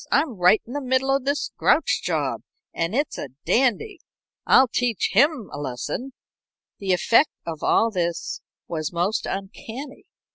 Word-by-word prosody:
I'm 285 0 +2
right 180 +5 +5
in 240 - -9
the 290 - -2
middle 260 +1 +1
of 275 -1 -2
this 285 +1 -1
Grouch - - +2
job, - - -1 0.3
and 165 +5 -2
it's 290 +3 -1
a 140 - -5 0.2
dandy. 270 - +1 0.5
I'll 265 - +6
teach 240 -2 0
him 275 +1 +3
a 145 - -5
lesson." 145 - -4 0.7
The 195 -2 -1
effect 230 - +4 0.2
of 160 -2 -5
all 230 0 +3
this 175 -3 -2 0.3
was 155 -3 -3
most 180 +5 -1
uncanny. 225 +8 -7
230 Hz, 150 wpm, -23 LUFS, 175-270 Hz, 0.7 s, I'll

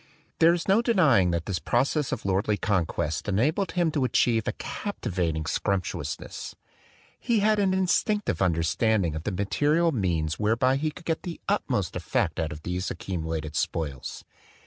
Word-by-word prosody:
There 165 +1 +7
is 170 - -5
no 200 +4 +5
denying 160 - +4
that 85 -1 -1
this 95 -5 -2
process 135 +4 0
of - - -4
lordly 100 +2 +1
conquest 85 -5 -1
enabled 150 - +1
him 175 -3 +2
to 145 -3 0
achieve 115 -3 +2
a - - +2
captivating 85 - -3
sumptuousness. 95 +2 -3 0.6
He 230 -3 +1
had 215 0 +3
an 195 -2 +3
instinctive 190 - +1
under 85 -3 +2
standing 100 -1 +1
of 80 +1 -6
the 105 - 0
material 150 - +2
means 85 - -1
whereby 115 +5 +2
he 155 +2 0
could 165 +3 -12
get 160 -1 -1
the 175 -3 -6
utmost - - 0
effect - - -1
out 80 -2 -1
of 75 +1 -8
these 90 +1 -2
accu 95 -3 -4
mulated 80 -1 -4
spoils. 70 -4 -3
105 Hz, 165 wpm, -26 LUFS, -, 0.6 s, There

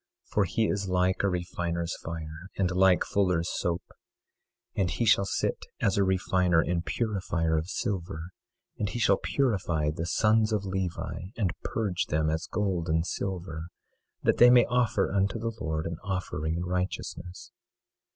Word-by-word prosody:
For 105 - +1
he 110 +5 +1
is 100 -1 -1
like 90 0 +2
a 100 - +2
refiner's 85 -1 -2
fire, 80 +1 -7
and 95 -2 +1
like 90 0 +4
fuller's 90 -4 +1
soap. 85 0 -1 0.9
24:3 - - 0
And 90 - +2
he 120 - -1
shall 100 -3 +5
sit - - -1
as 100 - +2
a 100 - +3
refiner 90 -2 +2
and 85 +2 0
purifier 90 -7 -1
of 80 +3 -1
silver; 90 -3 -3 0.5
and 105 - 0
he 120 - -4
shall 100 -4 +4
purify 90 - 0
the 80 +2 -4
sons 110 +3 +3
of 105 -2 0
Levi, 95 -2 -3
and 95 -7 +1
purge 100 -6 -1
them 80 0 +1
as 80 +1 -2
gold 95 -5 -1
and 80 +1 +2
silver, 85 -4 -4 0.6
that - - +3
they 120 - +9
may 125 -1 +7
offer 120 -5 +1
unto 100 +3 +1
the 115 +1 -2
Lord 80 0 -2
an 85 -1 -3
offering 85 -5 -2
in 85 +1 -2
righteousness. 90 0 -4
90 Hz, 160 wpm, -28 LUFS, 85-100 Hz, 0.9 s, they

